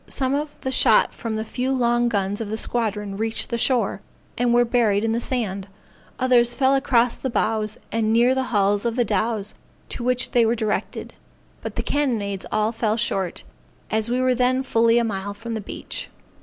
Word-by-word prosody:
Some 265 -1 -1
of 295 +1 -3
the 260 - -2
shot - - +4
from 225 -2 -4
the 220 0 -3
few 250 +3 -2
long 240 -2 +2
guns 200 -1 -1
of 215 - -4
the 220 - -3
squadron 210 -4 -2
reached 225 +3 -1
the 235 - 0
shore, 235 -6 +1 0.3
and 245 0 +1
were 240 0 +4
buried 225 -4 +2
in 225 - +1
the 230 +1 0
sand; 205 -7 -2 0.5
others 245 -2 +3
fell 265 0 +3
across 250 -3 +3
the 265 - -4
bows 215 -1 0
and 220 -1 0
near 240 +3 +4
the 265 0 -1
hulls 205 -3 +1
of 235 -1 -1
the 245 -2 +2
dows 210 0 -1 0.4
to 240 - -4
which 250 +1 +1
they 240 - +4
were 225 +1 +2
directed; 215 -2 -3 0.5
but - - -6
the - - -2
cannonades 220 -9 -1
all 215 +1 +1
fell 225 -1 -1
short, 195 -6 -1 0.5
as 220 +1 +1
we 250 +1 0
were 255 0 +3
then 255 +1 +1
fully 230 -2 +3
a 240 - +3
mile 200 -2 -3
from 230 +2 -6
the 220 - -3
beach. - - -6
230 Hz, 195 wpm, -23 LUFS, 215-250 Hz, 0.5 s, shot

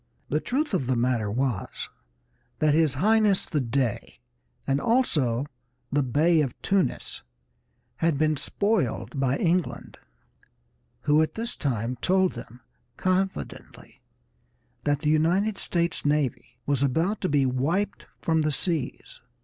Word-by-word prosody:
The 150 - +1
truth 280 - -1
of 135 -10 0
the 130 - +2
matter 120 -3 +1
was 125 -1 -1 0.9
that 155 -1 +3
his 155 -4 +3
Highness 210 +4 +3
the 150 -4 -1
Dey, 125 -2 -2 0.5
and 140 +1 +1
also 145 - +1 0.5
the 145 - +2
Bey 155 +6 +3
of 135 -5 -3
Tunis, 195 -2 0 0.8
had 165 -3 +1
been 155 +1 +2
spoiled 200 -3 -1
by 135 0 +1
England, 175 0 -1 1.0
who 150 +1 +4
at 155 0 -1
this 230 +1 -3
time 125 -2 -2
told 185 +5 +2
them 120 +1 -10 0.4
confidently 190 +1 -3 0.8
that 145 -1 +1
the 150 -2 +2
United 185 +7 +2
States 170 -1 -1
Navy 145 -4 -1
was 140 -2 0
about 165 +10 +1
to 185 - 0
be 140 -2 +3
wiped 165 +11 -1 0.2
from 160 -1 +2
the 155 0 +1
seas. 155 -2 -3
150 Hz, 130 wpm, -26 LUFS, 135-185 Hz, 1.0 s, who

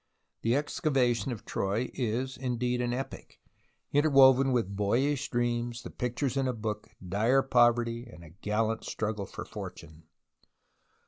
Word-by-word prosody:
The 115 +2 +2
excavation 135 -4 +1
of 115 - -7
Troy 105 +6 -1
is, 130 +2 -2
indeed, 125 -1 -1
an 120 0 0
epic, 130 +2 -6 0.5
interwoven 135 -2 +6
with 115 -6 0
boyish 130 +8 +1
dreams, 120 0 -1
the - - -8
pictures 125 +2 -2
in 135 -1 +1
a 130 - 0
book, 110 -1 -4 0.2
dire 115 +9 +3
poverty, 120 -2 +3
and 85 - -13
a 80 - -13
gallant 110 +4 -1
struggle 105 -2 -3
for - - -7
fortune. 80 +1 -9
120 Hz, 135 wpm, -29 LUFS, 110-130 Hz, 0.5 s, interwoven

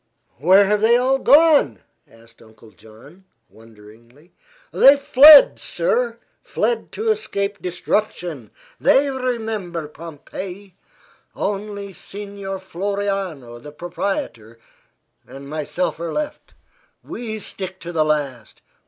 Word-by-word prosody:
"Where 190 +7 +5
have 210 +1 0
they 230 +2 +4
all 260 +2 +1
gone?" 290 - +4 0.3
asked 115 0 -21
Uncle 110 0 -18
John, 120 - -18 0.3
wonderingly. 115 - -19 0.4
"Fled, 280 +1 +7
sir; - - -1 0.2
fled 475 - -2
to 440 +1 0
escape 200 - -3
destruction. 175 - -3 0.3
They 275 +1 +3
remember 220 - -4
Pompeii. 180 +5 -10 0.6
Only 200 0 -4
Signor 200 0 -8
Floriano, 190 -9 -4
the 150 - -11
proprietor, 150 - -5 0.7
and 140 +1 -11
myself 155 +4 -3
are 170 0 -4
left. 300 -1 -6 0.5
We 225 -2 -6
stick 190 -2 -7
to 175 - -7
the 160 -2 +1
last. 140 -7 -3
190 Hz, 100 wpm, -20 LUFS, 145-215 Hz, 0.7 s, Fled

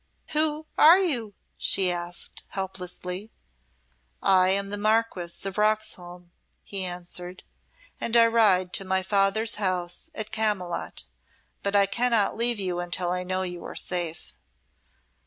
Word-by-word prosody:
"Who 310 0 0
are 325 +4 +9
you?" 245 - -1 0.2
she 185 -2 +3
asked, 175 0 -3
helplessly. 190 +1 -5 0.9
"I 185 - +4
am 200 +1 +1
the 205 - -1
Marquess 215 -5 0
of 195 +1 -3
Roxholm," 180 -5 -1 0.3
he 195 -2 -1
answered, 180 0 -5 0.6
"and 235 +1 +1
I 230 - +7
ride 205 -6 +3
to - - -1
my 190 0 0
father's 200 +4 +2
house 180 - -1
at 220 -1 -4
Camylott; 200 -6 -2 0.6
but 200 0 -1
I 200 -1 +6
cannot 230 0 +2
leave 235 -1 +1
you 180 -2 -2
until 175 0 -2
I 180 0 -1
know 185 +1 -2
you 175 -2 -6
are - - -8
safe." 175 -3 -2
195 Hz, 135 wpm, -26 LUFS, 180-220 Hz, 0.9 s, are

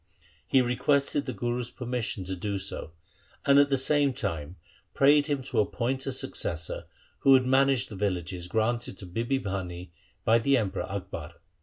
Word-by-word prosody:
He 130 -1 +4
requested 140 +3 +1
the - - -1
Guru's 120 +1 -2
permission 125 -5 -3
to 95 +1 -4
do 100 +2 -3
so, 95 -4 -5 0.5
and 140 0 +6
at 145 0 +5
the 135 - +2
same 145 +1 +2
time 90 - -3 0.4
prayed 145 +1 +5
him 145 -3 -1
to 130 - -1
appoint 125 +5 -1
a - - 0
successor 85 -9 -3 0.3
who - - +2
would 130 -1 +7
manage 135 -1 +3
the 110 - -9
villages 90 -3 -2
granted 110 +1 -1
to 95 - -8
Bibi 115 +9 -1
Bhani 90 -3 -5 0.3
by 115 +1 +5
the 135 +4 +3
Emperor 100 -4 -2
Akbar. 90 -5 -6
120 Hz, 165 wpm, -28 LUFS, 95-135 Hz, 0.5 s, would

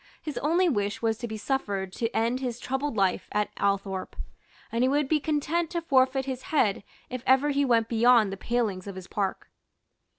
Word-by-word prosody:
His 300 - -5
only 340 +5 +2
wish 205 -7 -1
was 225 -1 +1
to 240 - -4
be 220 -1 -5
suffered 205 -6 -2
to 230 +2 -1
end 235 +3 0
his 245 -3 -4
troubled 265 -1 -2
life 195 -2 +1
at 210 0 0
Althorpe; 195 -1 -1 0.6
and 230 +2 +1
he - - +4
would 285 +1 +1
be 310 +2 +2
content 310 +3 0
to 340 -1 -2
forfeit 265 -3 +3
his 260 -2 -4
head 220 -12 +1 0.3
if 255 -1 -4
ever 265 +3 +4
he 285 0 +2
went 230 -4 +3
beyond 230 -2 +4
the - - -3
palings 205 -3 -2
of 200 - -6
his 185 -1 -8
park. 195 0 -3
240 Hz, 195 wpm, -27 LUFS, 205-275 Hz, 0.6 s, he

